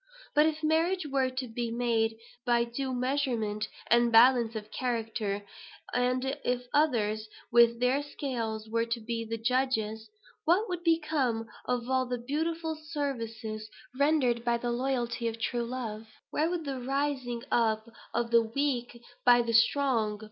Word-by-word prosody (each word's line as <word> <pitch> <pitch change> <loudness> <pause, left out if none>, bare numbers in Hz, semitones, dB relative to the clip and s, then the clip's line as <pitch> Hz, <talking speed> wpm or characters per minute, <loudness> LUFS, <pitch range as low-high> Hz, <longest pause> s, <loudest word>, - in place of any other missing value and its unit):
But 300 +1 +5
if 315 0 -2
marriage 330 +3 +2
were 270 -2 +1
to 255 0 -4
be 235 +1 -3
made 230 -1 0 0.3
by 240 -2 +3
due 260 +3 -3
measurement 245 -5 -1 0.2
and 235 0 +4
balance 235 0 +6
of 215 0 -6
character, 225 -4 -2 0.5
and 250 +1 +1 0.2
if 250 0 -1
others, 220 -8 +1 0.2
with 235 0 +5
their 250 +3 +2
scales, 230 -7 -4
were 230 +1 0
to 230 +1 -1
be 230 0 -3
the 225 0 -4
judges, 225 -3 0 0.3
what 370 +8 +3
would 355 -2 -4
become 305 -9 +1 0.2
of 245 -1 -1
all 260 -1 +1
the 245 0 -2
beautiful 320 +6 -2
services 230 -8 -4 0.3
rendered 265 -4 +2
by 235 -1 +2
the 240 0 -2
loyalty 240 -1 -1
of 225 0 -4
true 240 +1 -1
love? 225 -3 -5 0.2
Where 315 +2 +1
would 350 -2 -2
be 280 - -3
the 265 - -4
raising 260 -2 -2
up 220 -1 +2 0.2
of 235 0 -1
the 235 0 +6
weak 245 0 -2 0.2
by 245 -1 +6
the 230 0 -2
strong? 230 -3 +3
245 Hz, 155 wpm, -29 LUFS, 230-275 Hz, 0.5 s, balance